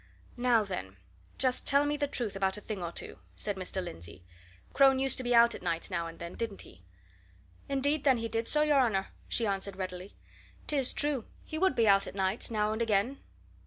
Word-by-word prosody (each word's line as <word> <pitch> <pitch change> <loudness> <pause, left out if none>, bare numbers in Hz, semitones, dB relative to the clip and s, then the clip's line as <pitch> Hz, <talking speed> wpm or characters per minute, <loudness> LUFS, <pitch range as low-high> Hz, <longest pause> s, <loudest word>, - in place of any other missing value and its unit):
"Now, 240 -2 +3
then, 100 - -6 0.4
just 255 -1 0
tell 280 +1 +5
me 295 0 0
the 290 -1 -1
truth 235 -7 -3
about 195 0 0
a - - -8
thing 210 -4 -5
or 170 -1 -3
two," - - -8 0.2
said 205 - -2
Mr. 190 0 -3
Lindsey. 85 - -9 0.5
"Crone 270 -1 +6
used 270 0 +1
to 260 - -4
be 245 -1 +2
out 235 0 +7
at - - -8
nights 170 +1 -2
now 170 -2 -1
and 165 0 -10
then, 170 +1 -7
didn't 225 -4 -4
he?" 90 - -16 0.9
"Indeed, 280 +2 +1
then, 265 -3 +4
he 230 0 -2
did 225 0 -2
so, 300 0 +4
your 295 -2 +4
honour," 205 -7 +1 0.2
she 235 - 0
answered 195 -1 -1
readily. 185 0 -6 0.5
"'Tis 275 -4 +1
true, 290 -6 -1 0.2
he 315 - -5
would 380 -6 +3
be 230 -2 +3
out 195 -1 +5
at - - -8
nights, 190 +3 0
now 215 -1 0
and 220 - -3
again." 225 +4 +1
225 Hz, 210 wpm, -30 LUFS, 190-265 Hz, 0.9 s, out